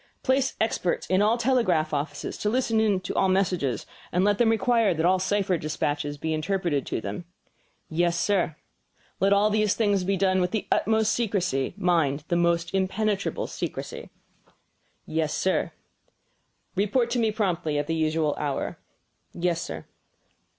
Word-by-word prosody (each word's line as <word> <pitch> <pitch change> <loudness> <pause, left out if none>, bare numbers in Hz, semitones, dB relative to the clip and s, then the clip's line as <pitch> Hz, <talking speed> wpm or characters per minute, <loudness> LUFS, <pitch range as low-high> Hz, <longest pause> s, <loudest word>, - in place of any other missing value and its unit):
"Place 265 0 +1
experts 200 -5 0
in 185 +1 +4
all 215 +3 +3
the 235 - -4
telegraph 185 -12 +2
offices 145 0 -3
to 210 - 0
listen 220 -4 +2
to - - -4
all 190 - +2
messages; 180 -9 0 0.3
and 180 - +2
let 205 -1 +2
them 235 -2 +4
require 225 -4 +2
that 160 +1 0
all 185 +1 +4
cipher 190 -2 0
despatches 145 -1 -2
be 160 +2 -2
interpreted 160 -3 -1
to - - -2
them." 105 - -5 0.6
"Yes, 170 +1 +1
sir." 180 -5 +1 0.6
"Let 195 +2 +3
all 205 +1 +4
these 215 -1 +2
things 205 -4 +1
be 195 +1 0
done 185 0 +2
with 180 - +1
the 215 +2 -2
utmost's 220 0 +2
secrecy 185 - -1
mind, 155 -5 +1
the 175 - +2
most 170 0 +1
impenetrable 200 - 0
secrecy." - - -6 1.0
"Yes, 155 -1 -1
sir." 190 - 0 1.0
"Report 230 +5 +1
to 245 - +1
me 225 -1 +2
promptly 180 -8 -1
at 145 - 0
the 165 - -2
usual 155 -1 +1
hour." 145 -2 -3 0.5
"Yes, 170 -1 -1
Sir." - - -6
185 Hz, 155 wpm, -26 LUFS, 160-210 Hz, 1.0 s, in